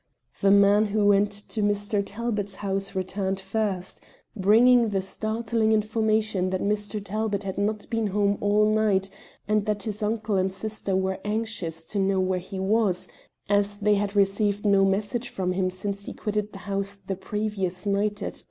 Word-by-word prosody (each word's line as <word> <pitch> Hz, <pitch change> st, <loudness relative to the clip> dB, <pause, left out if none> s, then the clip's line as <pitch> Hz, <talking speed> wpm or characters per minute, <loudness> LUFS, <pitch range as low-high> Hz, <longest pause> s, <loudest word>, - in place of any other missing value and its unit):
The 195 Hz, -, +4 dB
man 200 Hz, +1 st, +5 dB
who 210 Hz, 0 st, +1 dB
went 205 Hz, 0 st, +4 dB
to 205 Hz, +2 st, -2 dB
Mr. 205 Hz, 0 st, +1 dB
Talbot's 210 Hz, -2 st, -3 dB
house 195 Hz, 0 st, -2 dB
returned 190 Hz, +1 st, -2 dB
first, 195 Hz, -2 st, -2 dB, 0.3 s
bringing 230 Hz, +4 st, +5 dB
the 195 Hz, -2 st, 0 dB
startling 220 Hz, +3 st, -1 dB
information 215 Hz, -3 st, +1 dB
that 185 Hz, 0 st, -1 dB
Mr. 210 Hz, +1 st, 0 dB
Talbot 210 Hz, 0 st, -2 dB
had 190 Hz, -1 st, -4 dB
not 210 Hz, +1 st, -1 dB
been 225 Hz, -2 st, 0 dB
home 200 Hz, 0 st, +1 dB
all 205 Hz, +1 st, +3 dB
night, 210 Hz, -3 st, +2 dB, 0.4 s
and 210 Hz, 0 st, +1 dB
that 210 Hz, -2 st, -1 dB
his 215 Hz, 0 st, -3 dB
uncle 215 Hz, -1 st, 0 dB
and 190 Hz, 0 st, +1 dB
sister 200 Hz, 0 st, -3 dB
were 190 Hz, 0 st, 0 dB
anxious 210 Hz, -7 st, -2 dB
to 205 Hz, -, -3 dB
know 195 Hz, 0 st, +2 dB
where 185 Hz, 0 st, +1 dB
he 190 Hz, +2 st, -8 dB
was, 195 Hz, -1 st, +1 dB, 0.4 s
as 205 Hz, 0 st, +1 dB
they 210 Hz, 0 st, +2 dB
had 205 Hz, 0 st, -1 dB
received 200 Hz, +1 st, +1 dB
no 200 Hz, -1 st, +5 dB
message 205 Hz, +5 st, -1 dB
from 185 Hz, -1 st, -2 dB
him 185 Hz, 0 st, 0 dB
since 200 Hz, +2 st, -5 dB
he -, -, -6 dB
quitted 210 Hz, -1 st, -3 dB
the -, -, -9 dB
house 200 Hz, 0 st, -1 dB
the 195 Hz, -1 st, -5 dB
previous 195 Hz, -1 st, -3 dB
night 205 Hz, +1 st, 0 dB
at -, -, -4 dB
10. -, -, -5 dB
205 Hz, 175 wpm, -26 LUFS, 195-215 Hz, 0.4 s, man